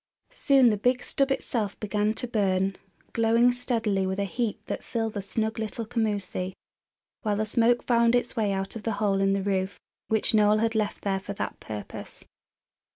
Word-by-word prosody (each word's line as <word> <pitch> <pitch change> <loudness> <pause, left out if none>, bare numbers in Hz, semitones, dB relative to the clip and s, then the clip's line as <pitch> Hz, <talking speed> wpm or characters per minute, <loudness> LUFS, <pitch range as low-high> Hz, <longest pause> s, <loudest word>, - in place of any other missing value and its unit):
Soon 275 - +4
the 210 - 0
big 250 +4 +1
stub 275 0 +1
itself 225 -6 -2
began 210 +1 0
to 245 - -3
burn, 195 -4 +1 0.4
glowing 230 +2 +4
steadily 225 -6 0
with 190 0 -2
a 200 - 0
heat 220 +2 -2
that - - -4
filled 225 -2 -2
the 205 - -3
snug 220 +3 -2
little 220 +1 -3
commoosie, 205 -5 -2 0.7
while 210 -4 0
the 215 +1 0
smoke 235 +2 +3
found 235 -1 +3
its 245 +1 0
way 215 -4 +1
out 195 +1 -2
of 225 - -5
the 225 0 -1
hole 200 -1 +1
in 195 0 +3
the 195 -1 0
roof 190 -1 -1 0.3
which 220 0 +2
Noel 210 0 +5
had 225 +1 +1
left 215 -2 -2 0.2
for 200 - -5
that - - -4
purpose. 105 -1 -7
215 Hz, 180 wpm, -27 LUFS, 200-235 Hz, 0.7 s, Noel